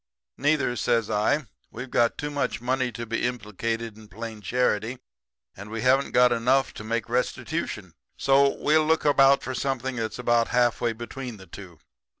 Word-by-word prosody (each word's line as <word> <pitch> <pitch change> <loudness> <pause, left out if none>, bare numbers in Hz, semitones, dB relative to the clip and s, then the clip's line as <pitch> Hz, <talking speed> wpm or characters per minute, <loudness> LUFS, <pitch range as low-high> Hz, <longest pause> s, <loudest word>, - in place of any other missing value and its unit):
"'Neither,' 140 -3 +1
says 115 -2 +1
I. 110 +8 +1 0.2
'We've 125 +2 -8
got 115 -1 +2
too 145 0 -4
much 145 -1 -2
money 130 +1 -1
to 120 -1 -6
be 115 +1 -2
implicated 115 -1 -3
in 110 - -14
plain 110 +1 -8
charity; 120 +2 0 0.6
and 100 +2 -10
we 110 +1 -4
haven't 135 +2 +3
got 125 0 +4
enough 130 +3 +2
to - - -8
make 115 +1 -2
restitution. 125 +2 -3 0.2
So, 140 +1 +4
we'll 155 +1 +3
look 160 -1 +2
about 140 -1 +5
for 130 - -4
something 130 0 -2
that's 110 -1 -3
about 120 -1 +2
half 120 -1 +2
way 120 -1 +1
between 120 +1 -7
the 95 - -13
two.' 95 -4 -11
120 Hz, 170 wpm, -25 LUFS, 115-135 Hz, 0.6 s, about